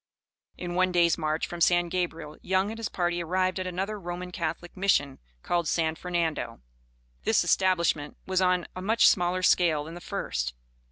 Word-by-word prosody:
In 175 -1 -5
one 185 +1 +2
day's 170 -1 +4
march 155 -1 -1
from 175 -1 -7
San 175 +1 +4
Gabriel, 165 -4 -3
Young 190 +2 +1
and 225 - -7
his 225 - -3
party 175 -1 -1
arrived 185 +2 0
at 185 - -3
another 195 +4 -3
Roman 180 0 -6
Catholic 170 0 -4
Mission, 185 -8 +1 0.2
called 170 -2 0
San 160 0 +1
Fernando. 160 - -2 0.6
This - - +3
establishment 170 -6 +1
was 190 0 +1
on 180 -1 +2
a 185 - -5
much 220 +4 +4
smaller 180 0 +2
scale 165 -5 +3
than 160 +2 -9
the 175 - -9
first. - - -3
175 Hz, 170 wpm, -27 LUFS, 165-185 Hz, 0.6 s, day's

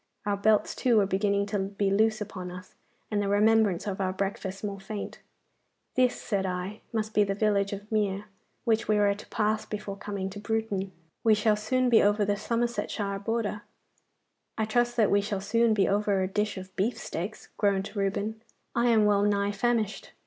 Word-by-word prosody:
Our 205 -1 +1
belts, 210 +1 +2
too, 240 -3 +2
were 205 - +5
beginning 200 +1 +1
to 205 0 -2
be 195 0 -1
loose 215 +2 +2
upon 190 -3 -5
us, 180 +1 -10 0.4
and 205 -1 +1
the 200 - -1
remembrance 210 -2 +3
of 200 -1 -3
our 185 -1 +1
breakfast 195 0 -4
more 200 -1 -3
faint. 200 +1 -6 0.7
'This,' 255 -1 +2
said 200 -3 -1
I, 185 +3 -4
'must 215 -1 -2
be 210 - +5
the 195 -1 -1
village 200 -1 +1
of 205 +2 -7
Mere, 205 -2 0 0.4
which 225 -1 +2
we 215 - +3
were 205 -1 +4
to 205 - -11
pass 215 0 0
before 210 -2 -5
coming 200 -1 -4
to 205 - -7
Bruton. 205 -3 -2 0.3
We 220 -2 +5
shall 210 0 +3
soon 255 +5 +1
be 235 -2 +6
over 205 0 +3
the 205 0 +1
Somersetshire 230 -3 -2
border.' 210 0 -2 1.0
'I 220 - +1
trust 240 +2 +1
that 220 -3 +4
we 200 - +4
shall 205 -1 -2
soon 225 +3 +2
be 195 -2 +3
over 200 -1 +1
a - - 0
dish 210 +1 -1
of 185 0 -9
beefsteaks,' 205 -2 -3
groaned 200 0 0
Reuben. 200 +2 -1 0.3
'I 235 +1 +2
am 220 -3 +5
well 205 -1 +4
nigh 205 0 +2
famished. 220 0 -1
205 Hz, 185 wpm, -28 LUFS, 195-220 Hz, 1.0 s, be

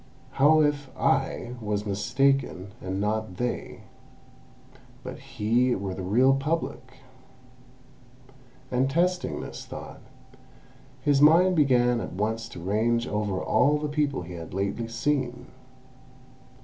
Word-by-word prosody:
How 150 +4 +5
if 145 -2 0
I 135 -2 0
was 105 -1 -2
mistaken, 105 0 0
and 95 +1 -3
not 105 -2 -2
they, 125 0 -3 1.2
but - - -7
he 125 -2 +1
were 95 -1 -4
the 95 - -6
real 120 +9 +4
Public?" 135 -2 -3 1.7
And 130 +2 +1
testing 180 +4 0
this - - -8
thought, - - -9 1.0
his 145 -2 +2
mind 175 +5 +6
began 125 -5 +3
at - - -6
once 110 +4 -2
to 90 - -9
range 115 +6 0
over 105 -2 -1
all 145 +9 +3
the 150 0 -3
people 145 - -1
he 90 +1 -9
had 85 +1 -8
lately 100 +4 -2
seen. 125 +1 -2
125 Hz, 120 wpm, -26 LUFS, 105-140 Hz, 1.7 s, mind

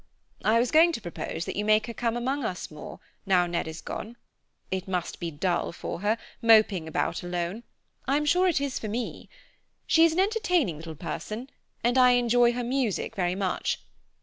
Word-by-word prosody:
"I 220 +1 +4
was 245 +1 +1
going 325 +2 +6
to - - -3
propose 175 -3 -5
that - - -4
you 205 - -1
make 215 +1 +3
her 235 - -6
come 235 0 -1
among 265 +3 -1
us 180 -7 -4
more, 150 - -9 0.3
now 180 -2 +4
Ned 170 -2 -2
is 160 0 -7
gone. 230 +3 -6 0.5
It 190 0 -2
must 180 -2 -3
be 170 - -3
dull 175 +3 -1
for 170 - -6
her, 210 +4 +1 0.2
moping 215 -7 +5
about 160 - -1
alone. 175 +4 -3 0.5
I'm 290 +3 +2
sure 360 +5 +4
it 340 -6 +2
is 280 -2 -2
for 220 - -5
me. 230 +3 -4 0.6
She 325 - +5
is 330 -1 +5
an 345 - 0
entertaining 370 - +1
little 160 0 -8
person, 215 - -6 0.3
and 245 +2 +3
I 250 -1 +7
enjoy 240 0 +4
her 245 0 -2
music 245 -4 -1
very 180 -1 0
much. 190 -2 -1
225 Hz, 190 wpm, -27 LUFS, 180-255 Hz, 0.6 s, I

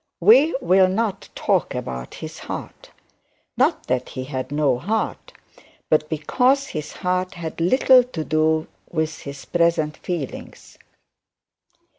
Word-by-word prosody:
We 250 - +6
will 190 -4 +5
not 200 +1 -2
talk - - 0
of 60 -1 -5
his - - -8
heart: - - -8 0.7
not - - +1
that 125 0 -1
he 130 - -5
had 130 -1 -5
no 145 -4 +1
heart, 215 +9 -2 0.6
but 155 -1 +3
because 255 - +1
his 150 -1 -5
heart 185 0 -2
had 165 -1 -6
little 255 +7 +5
to 175 -11 -5
do 155 0 +1 0.3
with 160 -2 -2
his 140 -1 -9
present 170 -3 +1
feelings. 165 -7 -6
160 Hz, 125 wpm, -22 LUFS, 150-190 Hz, 0.7 s, We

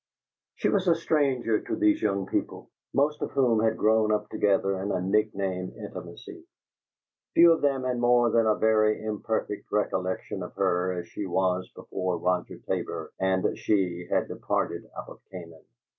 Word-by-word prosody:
She - - 0
was 195 -2 +1
a 170 - +5
stranger 135 -9 +1
to - - -3
these 105 0 +2
young 100 -2 0
people, - - -4 0.2
most 150 +2 +1
of - - -3
whom 125 -5 +3
had 110 0 +1
grown 110 0 +3
up 105 0 -1
together 95 -1 +1
in 100 +1 -2
a 95 - 0
nickname 95 -1 -1
intimacy. - - -9 0.9
Few 170 0 +8
of 165 - +2
them 135 -2 +1
had 125 -1 -1
more 120 -1 +4
than 115 -1 +3
a 110 - +4
very 110 -1 +3
imperfect 110 -1 -3
recollection 95 -3 -2
of - - -7
her 90 +1 +1
as 85 - -8
she 100 - -5
was 95 0 0
before 95 -1 -3
Roger 90 0 -1
Tabor - - -3
and 95 0 +1
she 90 -4 -1
had - - +1
departed - - -3
out - - -6
of - - -12
Canaan. 85 -4 -11
105 Hz, 165 wpm, -27 LUFS, 95-120 Hz, 0.9 s, Few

